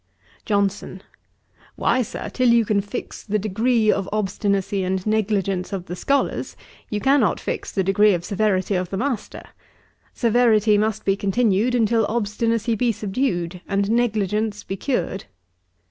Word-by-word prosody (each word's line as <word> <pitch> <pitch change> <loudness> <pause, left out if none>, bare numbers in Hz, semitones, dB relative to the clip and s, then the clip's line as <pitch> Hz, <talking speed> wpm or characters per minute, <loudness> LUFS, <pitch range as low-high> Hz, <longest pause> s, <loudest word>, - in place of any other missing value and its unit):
JOHNSON. 200 -2 -1 0.7
'Why, 255 - +1
Sir, 230 - -5
till 255 -2 +1
you 235 -1 +4
can 205 -1 +1
fix 205 +5 -7
the 215 0 -1
degree 220 +2 +2
of 195 -2 -2
obstinacy 200 -1 -1
and 185 0 -2
negligence 200 -4 0
of 190 -3 -4
the 180 - -6
scholars, 280 +9 -1 0.3
you 210 - -2
cannot 265 -6 +2
fix - - -4
the 190 - 0
degree 200 +1 +4
of 175 0 -5
severity 200 -1 0
of 180 -1 -1
the 195 - -3
master. 250 -1 -3 0.7
Severity 225 -3 +3
must 215 0 0
be 195 - +3
continued 210 +3 +1
until 225 -2 +2
obstinacy 230 +1 0
be 235 +2 +1
subdued, 190 -5 -2
and 200 +1 0
negligence 215 -2 0
be 195 - -4
cured.' 195 -4 -2
210 Hz, 145 wpm, -22 LUFS, 195-230 Hz, 0.7 s, you